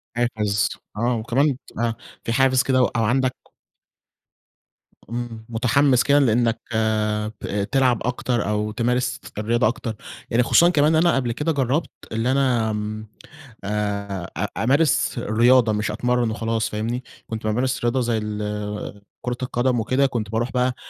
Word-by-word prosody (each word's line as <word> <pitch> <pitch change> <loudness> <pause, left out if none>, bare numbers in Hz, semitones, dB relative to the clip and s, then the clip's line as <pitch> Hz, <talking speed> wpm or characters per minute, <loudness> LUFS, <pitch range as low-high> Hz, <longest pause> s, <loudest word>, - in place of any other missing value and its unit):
حافز 110 -3 0 0.3
آه، 120 +2 +1
وكمان 130 +5 +1
تبقى 115 -1 -2 0.3
في 115 - -2
حافز 130 0 +3
كده 130 -1 +2
و - - +5
أو 115 -1 -1
عندك 130 +3 +1 1.7
إمم، 115 -2 -5
مُتحمِّس 125 +3 +3
كده 145 0 +4
لأنَّك 115 -3 +2 0.8
بت 100 +4 -3
تلعب 130 -4 +3
أكتر، 120 -3 -1
أو 105 0 -1
تمارس 125 +2 0 0.2
الرياضة 115 +1 +2
أكتر، 115 -1 -3 0.3
يعني 120 +2 +3
خصوصًا 170 +7 +5
كمان 155 -1 +3
أنا 170 0 +4
قبل 125 -3 0
كده 150 +7 -1
جرَّبت 140 +3 0 0.2
إن 115 +2 -1
أنا 125 -4 +2
آمم، 105 +1 -4 0.6
آآ، 100 -3 -3 0.3
أ - - -1
أمارس 140 +1 +2
الرياضة، 120 +1 +4
مش 105 0 -1
أتمرَّن 120 +1 0
وخلاص، 115 0 -1
فاهمني؟ 115 +4 -3 0.2
كنت 110 -1 -5
بامارس 125 +4 0
رياضة 120 +2 +1
زي 120 -1 0
ال 105 -1 -4 0.2
كورة 125 0 -3
القدم 125 -1 0
وكده، 130 +5 +2
كنت 115 -6 -2
باروح 120 +3 -1
بقى 125 0 +1
120 Hz, 145 wpm, -22 LUFS, 110-130 Hz, 1.7 s, و